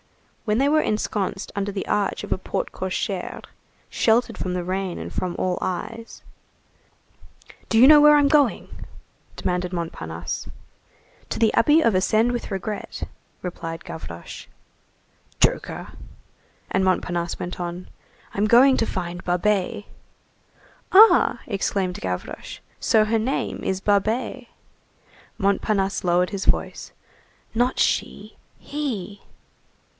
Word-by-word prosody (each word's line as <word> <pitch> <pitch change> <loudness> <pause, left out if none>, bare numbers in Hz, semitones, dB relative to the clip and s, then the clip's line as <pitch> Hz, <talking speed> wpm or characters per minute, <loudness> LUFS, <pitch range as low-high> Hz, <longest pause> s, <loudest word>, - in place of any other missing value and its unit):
When 210 -1 +1
they 275 +3 +3
were 310 +1 +4
ensconced 205 -3 -2
under 200 0 -2
the 195 -1 -4
arch 205 -2 0
of - - 0
a - - -3
porte 185 - -3
cochère, 190 0 -4 0.4
sheltered 235 +2 +2
from 185 - -3
the 180 -1 -2
rain 185 0 -3
and - - -7
from 180 -1 -2
all 185 -1 -1
eyes:— 225 +5 -5 1.5
"Do 225 - +2
you 250 +4 +8
know 300 0 +9
where 300 0 +8
I'm 290 -1 +4
going?" 290 -3 +1 0.5
demanded 180 0 -1
Montparnasse. 85 - -5 0.8
"To - - -3
the 225 -1 +3
Abbey 300 +7 +5
of 230 -8 +3
Ascend 215 +5 +2
with 240 -1 -4
Regret,"36 205 +1 -5 0.4
replied 165 -2 -6
Gavroche. 85 - -8 0.9
"Joker!" - - 0 0.8
And 190 - +2
Montparnasse 175 -2 -1
went 180 +1 -5
on:— 175 +1 -5 0.5
"I'm 205 +2 +1
going 260 +4 +6
to 225 - +1
find 175 -1 -4
Babet." 205 +3 0 1.1
"Ah!" 435 +4 +7
exclaimed 195 -3 -2
Gavroche, 90 -1 -5 0.2
"so 215 -1 +3
her 225 +1 +1
name 250 +5 -2
is 190 0 -1
Babet." 220 +5 0 0.9
Montparnasse 200 -1 0
lowered 180 +1 +2
his 200 -1 -4
voice:— - - -1 0.6
"Not 245 +3 +1
she, - - -1 0.2
he." 220 -9 -5
200 Hz, 120 wpm, -23 LUFS, 180-230 Hz, 1.5 s, know